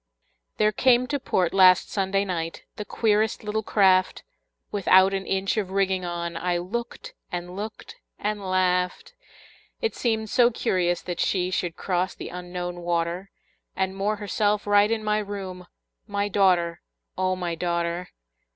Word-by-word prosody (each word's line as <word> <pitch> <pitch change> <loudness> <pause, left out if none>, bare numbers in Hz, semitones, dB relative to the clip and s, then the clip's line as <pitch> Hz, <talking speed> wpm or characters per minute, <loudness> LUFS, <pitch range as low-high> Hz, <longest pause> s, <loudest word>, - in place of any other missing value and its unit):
There 215 0 +3
came 250 +3 +4
to 285 - -1
port 180 -8 0
last 185 -2 +6
Sunday 195 0 0
night 165 -3 -4
The 210 - -6
queerest 215 0 +1
little 215 +1 -1
craft, 190 -3 +3 0.5
Without 190 -1 +5
an 195 0 -3
inch 195 +2 0
of 200 -4 -1
rigging 190 -1 0
on; 170 -1 -4
I 175 +1 0
looked 220 +7 -5 0.2
and 175 0 -5
looked 215 +3 -7 0.2
and 210 0 -2
laughed. 185 - 0 0.7
It 455 - -1
seemed 220 -3 -1
so 245 -2 +5
curious 175 -6 0
that 175 -1 -5
she 180 -1 +1
Should 175 -2 -2
cross 180 -1 -1
the - - -7
Unknown 180 0 -5
water, 170 +2 -2 0.5
And 190 0 -1
moor 205 +2 0
herself 205 0 0
right 205 0 +4
in 225 -1 -1
my 210 0 +1
room, 190 -3 -6 0.4
My 200 -1 -1
daughter, 180 -4 +2 0.3
O 185 0 0
my 175 -2 -3
daughter! 170 +1 -2
190 Hz, 150 wpm, -25 LUFS, 180-210 Hz, 0.7 s, last